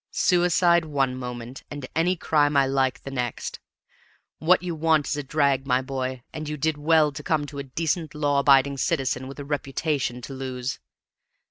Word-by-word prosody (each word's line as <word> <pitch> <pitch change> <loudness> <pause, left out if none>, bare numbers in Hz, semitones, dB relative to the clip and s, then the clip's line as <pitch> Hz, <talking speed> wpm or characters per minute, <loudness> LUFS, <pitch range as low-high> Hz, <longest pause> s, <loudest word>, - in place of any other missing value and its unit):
Suicide 175 -1 +3
one 135 -4 0
moment, 125 0 -7
and 145 -2 -6
any 175 +3 +2
crime 150 -3 +2
I 135 - +5
like 135 -1 0
the 135 - -6
next! 125 -3 -4 0.8
What 180 +3 +3
you 175 -2 -2
want 160 -2 +2
is - - 0
a 145 - -2
drag, 140 -1 +1
my 125 0 +2
boy, 130 -1 -4
and 155 -1 -5
you 150 - -3
did 160 +2 0
well 155 0 +3
to 145 +1 -7
come 150 0 0
to 145 0 -8
a - - -3
decent 160 +3 -2
law 145 -1 +1
abiding 140 0 +4
citizen 130 -3 -1
with 135 - -9
a 145 - -6
reputation 140 -2 -2
to 135 - -7
lose. 130 -1 -4
140 Hz, 180 wpm, -25 LUFS, 130-155 Hz, 0.8 s, I